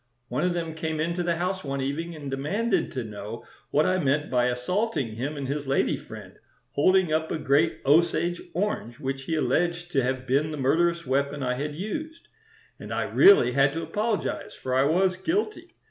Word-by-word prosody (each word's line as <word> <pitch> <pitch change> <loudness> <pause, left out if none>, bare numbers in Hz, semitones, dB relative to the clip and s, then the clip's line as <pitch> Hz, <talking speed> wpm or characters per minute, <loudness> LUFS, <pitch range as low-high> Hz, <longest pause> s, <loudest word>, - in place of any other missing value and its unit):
One 130 +6 -1
of 180 -1 +1
them 165 -2 -3
came 160 -1 -3
into 170 +3 -1
the 170 -1 0
house 185 +2 -2
one 140 -1 -3
evening 160 +5 -3
and 145 -3 -7
demanded 195 - 0
to 130 -3 -2
know 105 +1 -7 0.2
what 150 - +3
I 185 0 +2
meant 145 0 0
by 125 -1 +3
assaulting 135 - -1
him 140 +6 -3
and 140 -2 -4
his 140 +1 -3
lady 135 - +2
friend, - - -11 0.3
holding 185 +2 +3
up 160 0 0
a - - 0
great 150 +2 +2
Osage 170 +4 +3
orange 165 - -2
which 135 -1 -4
he 165 - -1
alleged 175 +2 0
to 135 - +2
have 130 +1 -2
been 140 +4 +1
the 155 - -5
murderous 170 +5 +2
weapon 140 +2 0
I 125 -1 0
had 145 +3 -4
used; 310 - -6 0.5
and - - -8
I - - 0
really 390 - +6
had 140 +2 +3
to 165 +1 -3
apologize, 210 +6 -2
for 130 - -4
I 130 +1 +4
was 185 +5 +2
guilty. 340 - -2
155 Hz, 190 wpm, -26 LUFS, 135-175 Hz, 0.5 s, really